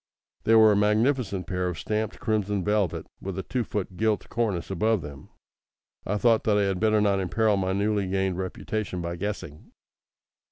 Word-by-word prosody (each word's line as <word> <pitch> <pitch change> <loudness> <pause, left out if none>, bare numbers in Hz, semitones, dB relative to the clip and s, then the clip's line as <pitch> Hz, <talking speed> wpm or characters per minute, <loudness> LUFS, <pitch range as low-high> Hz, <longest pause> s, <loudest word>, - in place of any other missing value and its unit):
They 115 - +5
were 110 -1 +7
a - - +3
magnificent 105 -1 +1
pair 90 +1 -2
of 90 -2 -3
stamped 110 0 -2
crimson 105 -3 0
velvet, 105 -3 0 0.2
with 95 -1 -5
a 95 - -3
two 125 -2 -2
foot 95 -4 -4
gilt 110 -2 0
cornice 105 -7 -1
above 110 +1 +1
them. 70 -2 -10 0.8
I 105 - 0
thought 115 0 +3
that 105 -2 +3
I 105 - +3
had 95 -2 0
better 110 -1 +3
not 100 -2 +2
imperil 105 +3 +1
my 95 -1 0
newly 100 0 0
gained 95 -1 -1
reputation 95 +1 -3
by 85 0 -3
guessing. 95 -6 -6
105 Hz, 175 wpm, -26 LUFS, 95-110 Hz, 0.8 s, were